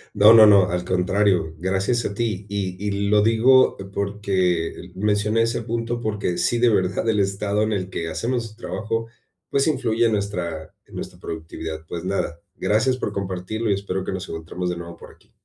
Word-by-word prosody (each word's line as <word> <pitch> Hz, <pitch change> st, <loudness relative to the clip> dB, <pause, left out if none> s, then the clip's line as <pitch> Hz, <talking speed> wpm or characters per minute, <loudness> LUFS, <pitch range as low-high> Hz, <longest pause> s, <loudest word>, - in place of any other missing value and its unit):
No, 105 Hz, +2 st, +8 dB
no, 110 Hz, -2 st, +9 dB
no, 100 Hz, -3 st, +6 dB
al 90 Hz, 0 st, -1 dB
contrario, 95 Hz, -2 st, +1 dB
gracias 95 Hz, +6 st, 0 dB
a -, -, -2 dB
ti. 105 Hz, -3 st, -2 dB
Y 95 Hz, -2 st, -3 dB
y 100 Hz, 0 st, -1 dB
lo 105 Hz, 0 st, +5 dB
digo 115 Hz, +4 st, +5 dB, 0.2 s
porque 95 Hz, -4 st, -1 dB
mencioné 105 Hz, +3 st, +1 dB
ese 115 Hz, +1 st, -1 dB
punto, 115 Hz, +1 st, -3 dB
porque 105 Hz, -5 st, -2 dB
sí 120 Hz, +7 st, +1 dB
de 120 Hz, 0 st, +4 dB
verdad 95 Hz, 0 st, 0 dB
el 110 Hz, -2 st, +2 dB
estado 100 Hz, +1 st, 0 dB
en 110 Hz, 0 st, +1 dB
el 95 Hz, -2 st, -2 dB
que 85 Hz, -2 st, -3 dB
hacemos 120 Hz, +8 st, -1 dB
nuestro 110 Hz, 0 st, -9 dB
trabajo, 115 Hz, +1 st, -2 dB, 0.4 s
pues, 140 Hz, +1 st, +1 dB
influye 120 Hz, -6 st, +1 dB
en 110 Hz, -, 0 dB
nuestra 90 Hz, -6 st, -3 dB
en -, -, -15 dB
nuestra -, -, -7 dB
productividad. 80 Hz, 0 st, -6 dB
Pues, 85 Hz, -1 st, -5 dB
nada, 95 Hz, -3 st, -2 dB
gracias 125 Hz, +5 st, +1 dB
por -, -, -3 dB
compartirlo 100 Hz, +3 st, -3 dB
y -, -, +4 dB
espero 95 Hz, -1 st, -3 dB
que -, -, -4 dB
nos 95 Hz, 0 st, -5 dB
encontremos 80 Hz, +2 st, -4 dB
de 90 Hz, -, -3 dB
nuevo 85 Hz, 0 st, -8 dB
por -, -, -13 dB
aquí. -, -, -28 dB
100 Hz, 190 wpm, -23 LUFS, 90-110 Hz, 0.4 s, no